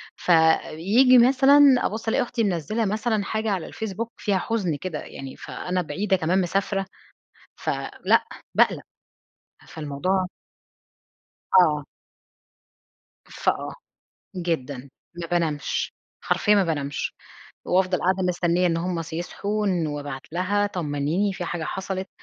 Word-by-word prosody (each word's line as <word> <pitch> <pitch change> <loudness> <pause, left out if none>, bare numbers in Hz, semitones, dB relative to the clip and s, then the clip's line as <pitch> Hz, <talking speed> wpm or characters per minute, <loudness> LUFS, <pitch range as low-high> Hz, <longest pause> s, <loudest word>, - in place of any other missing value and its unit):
فييجي 175 +9 +4
مثلًا 270 +3 +6 0.3
أبُصّ 220 +1 -3
ألاقي 240 - +2
أختي 235 -1 -2
منزّلة 200 +4 -1
مثلًا 215 +1 0
حاجة 220 +1 -2
على 190 -4 -2
الفيسبوك 220 +2 -5
فيها 200 -3 +1
حزن 185 -6 -1
كده 170 -5 -4
يعني، 135 -1 -9
فأنا 180 0 -3
بعيدة 190 +4 0
كمان 180 +2 +1
مسافرة، 195 +2 -1 0.7
فلأ، - - 0 0.3
باقلق، - - +3 0.9
فالموضوع 160 +5 -1 1.3
آه. 150 -5 +2 1.5
فآه، - - -1 0.6
جدًا، 140 -6 -3 0.3
ما 170 - -4
بانامش، 165 -4 -1 0.3
حرفيًا 210 - +3
ما 200 -2 +4
بانامش، 145 -4 -2 0.5
وافضل 185 0 +2
قاعدة 190 +1 +1
مستنية 175 0 +1
إن 165 -1 +1
هُم 170 0 -2
ص 165 0 -11
يصحوا 200 +5 -3
وان 180 -5 +1
وابعت 145 -2 -5
لها 200 +4 +1
طمنيني 170 +2 -1
في 185 -2 -5
حاجة 170 -1 -3
حصلت، 190 +2 -4
185 Hz, 115 wpm, -24 LUFS, 160-205 Hz, 1.5 s, مثلًا